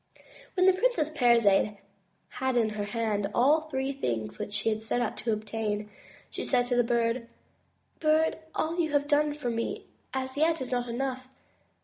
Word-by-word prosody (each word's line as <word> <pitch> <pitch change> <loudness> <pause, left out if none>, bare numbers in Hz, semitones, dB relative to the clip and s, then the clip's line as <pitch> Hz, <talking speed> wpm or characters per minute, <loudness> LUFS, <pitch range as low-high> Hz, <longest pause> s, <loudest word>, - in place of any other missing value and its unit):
When 365 -1 +4
the 380 - +7
Princess 370 -7 +1
Parizade 230 -6 +4 0.5
had 260 -1 -1
in 225 -2 +3
her 210 -1 -3
hand 210 -2 -1
all 290 +6 +5
the 310 - -14
three 265 -1 -1
things 115 - -3
which - - -4
she 205 +2 +1
had 215 0 -1
set 225 +2 -1
out 240 - -1
to 230 - -1
obtain, 215 -1 -3 0.4
she - - -4
said 245 -2 +2
to 245 - +2
the 245 - +4
Bird: 235 0 0 0.7
"Bird, 315 +1 +2 0.2
all 330 +3 -1
you 315 -3 0
have 290 0 +2
done 295 0 +2
for 250 -5 -3
me 230 0 -3 0.3
as 260 0 -3
yet 320 +2 +3
is 260 - -5
not 245 -1 0
enough. 255 +1 -3
245 Hz, 185 wpm, -28 LUFS, 225-295 Hz, 0.7 s, the